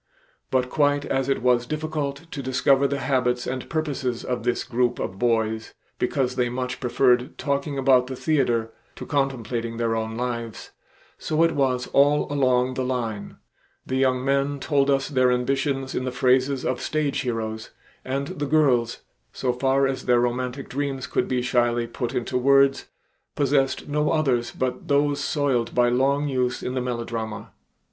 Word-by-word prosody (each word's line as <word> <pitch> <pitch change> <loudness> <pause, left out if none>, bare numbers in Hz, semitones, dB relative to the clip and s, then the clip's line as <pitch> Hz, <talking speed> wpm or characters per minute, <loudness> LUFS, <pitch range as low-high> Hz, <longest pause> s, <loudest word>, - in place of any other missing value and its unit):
But 130 -1 +1
quite 145 -1 +2
as 135 0 -1
it 135 - 0
was 120 -1 +3
difficult 155 -1 -3
to 140 - -4
discover 135 +1 +2
the 140 +1 -2
habits 125 -2 0
and 130 0 -4
purposes 140 -6 -2
of 125 -1 -2
this 120 +1 -1
group 120 0 0
of 95 +1 -5
boys 110 -2 0 0.2
because 125 0 0
they 125 -1 +1
much 125 +1 -4
preferred 125 0 +2
talking 140 0 -2
about 130 -2 +4
the 130 - -5
theater 120 -7 0 0.2
to - - -8
contemplating 120 -5 -2
their 115 -1 0
own 110 0 -3
lives, 115 -2 -4 0.5
so 155 +1 +1
it 165 - +3
was 130 -3 +1
all 145 +1 +4
along 130 -2 +2
the 130 - -2
line; 115 -5 -3 0.5
the 130 - -2
young 130 -1 +1
men 140 +1 +1
told 140 -1 +1
us 135 -1 +2
their 130 -3 +2
ambitions 135 +2 -1
in - - -2
the 130 - -2
phrases 130 +1 +2
of 130 - -1
stage 145 -2 -1
heroes, 110 -3 -3 0.3
and 135 +2 -3
the 145 - -1
girls, 130 -6 +2 0.3
so 125 -2 -1
far 135 +2 +2
as 135 -1 -3
their 120 -1 +4
romantic 125 +2 -2
dreams 135 -1 -3
could - - -1
be 125 -1 -1
shyly 120 -1 +1
put 120 +2 -4
into 125 +1 -1
words, 135 +1 +4 0.5
possessed 135 -1 +1
no 150 +1 0
others 135 -7 +1
but 130 -1 -3
those 145 0 +2
soiled 135 -7 0
by 120 0 +4
long 140 +4 +1
use 125 -2 -1
in 125 - -3
the 130 - -1
melodrama. 115 -3 -4
130 Hz, 165 wpm, -24 LUFS, 125-140 Hz, 0.5 s, about